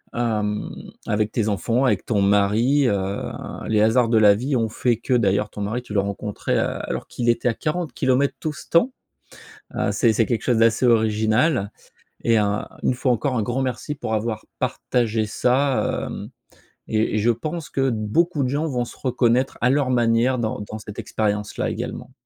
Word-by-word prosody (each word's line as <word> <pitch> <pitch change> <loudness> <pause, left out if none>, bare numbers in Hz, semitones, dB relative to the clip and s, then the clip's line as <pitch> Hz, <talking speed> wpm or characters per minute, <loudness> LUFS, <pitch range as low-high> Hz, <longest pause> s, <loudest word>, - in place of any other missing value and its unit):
Hem, 105 -3 -1 0.4
avec 105 0 0
tes 110 -3 0
enfants, 115 +5 +1
avec 130 - +1
ton 105 -4 +1
mari, 105 +8 +3
heu, 100 -2 -2 0.4
les 110 -1 +2
hasards 115 +2 +3
de 115 - +3
la 105 -2 +6
vie 130 +6 -1
ont 115 -2 +1
fait 120 +1 0
que, 120 +3 -2
d'ailleurs 105 -3 +2
ton 105 - -7
mari, 110 +5 -2
tu 110 - -9
l'as 100 - +3
rencontré, 100 +1 -3
heu, - - +2 0.3
alors - - -4
qu'il 120 -1 -2
était 120 - +1
à - - 0
40 155 +3 -3
kilomètres 130 +2 +1
tout 155 - -3
ce 165 - -11
temps. 170 +11 +3 0.8
Heu, - - 0
c'est 115 -3 +3
c'est 115 +1 +2
quelque 120 -3 -1
chose 120 -3 +2
d'assez 115 +2 +3
original 110 +1 +2 0.5
et 115 -1 +4
heu, - - +3 0.4
une - - +2
fois 125 0 +1
encore, 125 +2 -1
un 115 - +1
grand 120 +5 -1
merci 130 +3 -3
pour 110 -6 -3
avoir 110 0 -3
partagé 115 -3 0
ça, 130 +5 +1
hem, - - -7 0.6
et 110 0 0
et - - +2
je 110 +3 +3
pense 155 +8 -5
que 135 -1 +1
beaucoup 135 +9 0
de - - +1
gens 145 +4 -1
vont 125 -5 -1
se - - -12
reconnaître 125 0 +1
à 125 - +3
leur 140 0 +2
manière 120 +1 +2
dans 110 -2 -2
dans 110 +1 -7
cette 105 -1 -9
expérience-là, 105 -1 -2
également. - - -5
115 Hz, 190 wpm, -22 LUFS, 110-130 Hz, 0.8 s, la